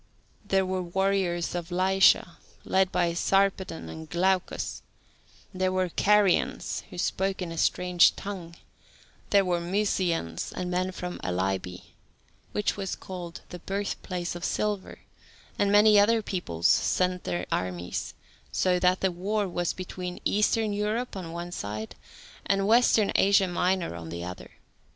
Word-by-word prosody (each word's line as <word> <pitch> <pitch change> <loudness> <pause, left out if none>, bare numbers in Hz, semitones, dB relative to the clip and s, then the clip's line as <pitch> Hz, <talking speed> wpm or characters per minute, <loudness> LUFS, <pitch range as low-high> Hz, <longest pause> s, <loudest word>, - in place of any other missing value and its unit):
There 195 -2 +1
were 185 0 -1
warriors 180 -1 0
of 175 -1 -4
Lycia, 185 -1 +3 0.3
led 190 -1 +2
by 175 -2 +1
Sarpedon 190 -1 +1
and 160 -1 -9
Glaucus; 185 +1 0 0.7
there 185 0 0
were 185 -1 0
Carians, 205 +1 +2
who - - -10
spoke 190 +2 -1
in 180 -3 -4
a 165 - -6
strange 180 -1 +4
tongue; 180 -4 -7 0.7
there 200 -1 +4
were 175 -1 0
Mysians 175 - -1
and 180 0 -4
men 185 +1 0
from 180 -1 -6
Alybe, 90 0 -3 0.6
which 210 - 0
was 195 -2 -3
called 180 -2 -8
"the 180 - -8
birthplace 185 -2 -3
of 175 0 -8
silver," 210 -2 -2 0.6
and 200 0 +2
many 210 0 +7
other 220 +2 +4
peoples 85 - -1
sent 180 - +2
their 90 0 -2
armies, 90 -1 -3 0.4
so 180 -1 +2
that 180 +1 +2
the 190 - +2
war 200 +4 -1
was 175 -1 -1
between 180 -1 -6
Eastern 210 +1 +2
Europe, 210 +4 -2
on 180 -4 -6
one 170 +1 -6
side, 110 -6 -5 0.5
and 195 0 +2
Western 225 -1 +4
Asia 195 -1 +4
Minor 180 - 0
on 85 -1 -8
the 85 +1 -5
other. 90 0 -8
185 Hz, 140 wpm, -27 LUFS, 170-195 Hz, 0.7 s, many